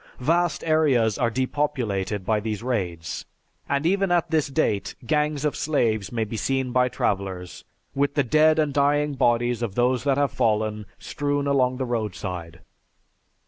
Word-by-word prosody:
Vast 170 +6 +1
areas 140 -9 +2
are 120 - +2
depopulated 115 -7 -2
by 110 +1 +2
these 110 0 -4
raids 90 -10 -3 0.4
and 140 +2 0
even 195 +1 +2
at 175 -1 +1
this 155 -2 +2
date, 135 -8 -1
gangs 150 +2 0
of 150 - 0
slaves 115 -9 0
may 115 -2 -1
be 110 +1 -5
seen 130 +1 -1
by 125 0 +3
travelers, 95 -5 -3 0.3
with 140 +1 0
the 145 - +3
dead 155 +5 +4
and 150 -3 +1
dying 145 +1 +2
bodies 120 -2 +1
of 110 -5 -3
those 125 0 +2
that 140 -1 +1
have 145 -2 +1
fallen 105 -1 0
strewn 145 -1 -2
along 130 -2 +2
the 130 - -2
roadside. 95 -7 -4
125 Hz, 155 wpm, -24 LUFS, 110-145 Hz, 0.4 s, dead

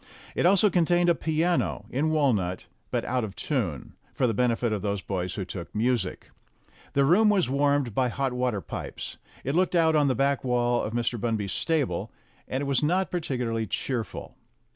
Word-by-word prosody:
It - - +2
also 195 +2 +5
contained 175 0 +3
a - - +6
piano, 165 +2 0
in 145 +5 +1
walnut, 115 - +1 0.2
but - - -1
out 125 -1 0
of 100 -3 -5
tune, 105 - -2 0.2
for 130 - +2
the 115 - +1
benefit 120 0 +1
of 105 - -2
those 100 0 -1
boys 90 -2 -3
who 95 - -3
took 90 0 -8
music. 110 -4 -1 0.6
The 140 0 +3
room 205 +9 +5
was 190 -10 +2
warmed 140 -3 +2
by 125 +2 +1
hot 135 +1 -1
water 125 -5 -1
pipes. - - -6 0.3
It 135 - -1
looked 180 +2 +2
out 160 -2 +4
on 145 -2 +4
the 130 - +2
back 140 +2 +1
wall 120 -1 +1
of 110 - -4
Mr. 120 0 -1
Bunby's 110 -5 -1
stable, 160 -5 -1 0.4
and 130 - -2
it - - -2
was 140 -2 +1
not 180 +5 +1
particularly 125 -9 -2
cheerful. 120 +2 -4
130 Hz, 185 wpm, -27 LUFS, 115-155 Hz, 0.6 s, a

